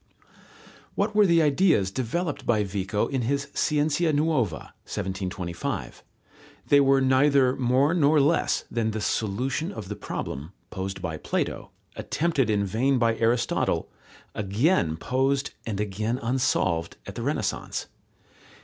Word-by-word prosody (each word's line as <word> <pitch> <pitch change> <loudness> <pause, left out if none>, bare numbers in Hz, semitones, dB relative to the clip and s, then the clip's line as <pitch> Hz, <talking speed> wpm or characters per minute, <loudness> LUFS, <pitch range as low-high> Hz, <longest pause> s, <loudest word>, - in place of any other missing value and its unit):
What - - 0
were 210 -1 +5
the 170 -2 +4
ideas 145 - +3
developed 145 - -2
by 110 -3 +2
Vico 100 +1 -1
in 135 -2 -2
his 140 +4 -1
Scienza 150 +2 +1
nuova 145 - 0 0.2
(1725)? 95 -2 -4 0.7
They 145 - +7
were 135 0 +4
neither 130 0 +4
more 130 +4 +2
nor 155 -3 +4
less 150 +4 +2
than 115 -2 0
the 110 0 -3
solution 125 - -1
of 105 - -8
the 105 - -4
problem, 75 0 -6 0.2
posed 95 -1 -5
by 80 -2 -3
Plato, - - -3 0.3
attempted 155 -7 0
in 100 -1 +1
vain 125 +8 +1
by 115 -2 +2
Aristotle, 115 +1 0 0.4
again 100 - +1
posed 135 - 0 0.2
and 105 -3 -3
again 105 +3 -2
unsolved 115 -9 0
at - - -7
the - - -6
Renaissance. - - -2
125 Hz, 130 wpm, -26 LUFS, 100-145 Hz, 0.7 s, They